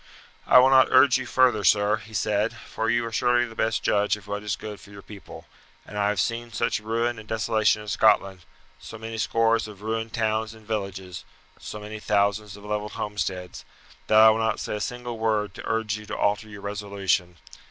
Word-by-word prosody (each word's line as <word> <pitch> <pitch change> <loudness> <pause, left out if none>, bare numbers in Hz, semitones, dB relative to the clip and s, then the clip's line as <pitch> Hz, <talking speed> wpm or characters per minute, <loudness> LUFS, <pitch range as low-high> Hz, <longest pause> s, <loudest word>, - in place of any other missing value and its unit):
"I - - +7
will 130 +1 +7
not 130 -1 +6
urge 130 -2 +5
you 130 - -6
further, 125 -5 +3
sir," 105 +3 +3
he 110 -1 -12
said, 105 +2 0
"for 115 -1 -4
you 120 0 +1
are 115 - -5
surely 120 +2 +2
the 115 - -10
best 110 -1 -1
judge 105 +1 +2
of 105 - -15
what 100 0 -4
is 105 0 -2
good 105 -1 -8
for - - -16
your 100 -1 -12
people, 100 -5 -12 0.4
and 105 - -11
I 105 0 +1
have 105 -2 -1
seen 115 +4 -2
such 110 - -1
ruin 115 +2 -1
and 110 - -12
desolation 110 -1 +1
in - - -13
Scotland, 95 -2 +2 0.4
so 115 - -10
many 115 0 -6
scores 115 +1 +1
of 105 -1 -12
ruined 110 +1 -3
towns 110 0 -1
and 110 -1 -17
villages, 95 -4 -5 0.4
so 105 - -8
many 105 +1 -8
thousands 105 0 0
of 100 - -13
levelled 105 0 -3
homesteads, 95 -3 -4 0.4
that 110 - +4
I 110 0 +9
will 110 - 0
not 110 -1 0
say 105 - -3
a - - -6
single 120 0 -5
word 105 -3 0
to - - -8
urge 110 -1 -1
you 105 0 -11
to - - -5
alter 105 +2 0
your 105 -1 -10
resolution. 100 -4 -2
105 Hz, 210 wpm, -25 LUFS, 105-115 Hz, 0.4 s, I